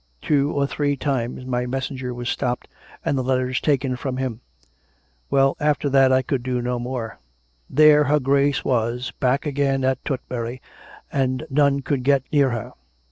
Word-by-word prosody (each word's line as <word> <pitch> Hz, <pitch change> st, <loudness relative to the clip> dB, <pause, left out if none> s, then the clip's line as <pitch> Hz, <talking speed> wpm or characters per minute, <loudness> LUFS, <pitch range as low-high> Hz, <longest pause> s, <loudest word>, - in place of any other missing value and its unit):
Two 145 Hz, -, +1 dB
or 140 Hz, -1 st, +1 dB
three 145 Hz, 0 st, -1 dB
times 130 Hz, -2 st, -2 dB
my 125 Hz, -1 st, -1 dB
mes 130 Hz, +1 st, -2 dB
senger 130 Hz, -3 st, -5 dB
was 120 Hz, 0 st, -5 dB
stopped, 125 Hz, 0 st, -2 dB, 0.4 s
and -, -, +1 dB
the 130 Hz, -, 0 dB
letters 130 Hz, 0 st, 0 dB
taken 135 Hz, -3 st, +1 dB
from 130 Hz, 0 st, -4 dB
him. 130 Hz, -3 st, -3 dB, 0.9 s
Well; 135 Hz, 0 st, +3 dB
after 150 Hz, -1 st, +1 dB
that 135 Hz, -1 st, +6 dB
time 130 Hz, 0 st, +4 dB
I 130 Hz, -, 0 dB
could 130 Hz, 0 st, -1 dB
do 125 Hz, 0 st, -2 dB
no 120 Hz, 0 st, -2 dB
more. 120 Hz, -2 st, -5 dB, 0.5 s
There 150 Hz, 0 st, +6 dB
her 150 Hz, +2 st, +3 dB
Grace 140 Hz, +1 st, +1 dB
was, 120 Hz, +1 st, 0 dB
back 135 Hz, +3 st, +1 dB
again 140 Hz, -2 st, 0 dB
at 130 Hz, -1 st, 0 dB
Tutbury, 125 Hz, -3 st, -4 dB, 0.5 s
and 130 Hz, +1 st, 0 dB
none 140 Hz, 0 st, +3 dB
could 135 Hz, 0 st, -1 dB
get 140 Hz, -1 st, +3 dB
near 140 Hz, -3 st, +4 dB
her. 120 Hz, -3 st, -4 dB
130 Hz, 175 wpm, -22 LUFS, 125-140 Hz, 0.9 s, that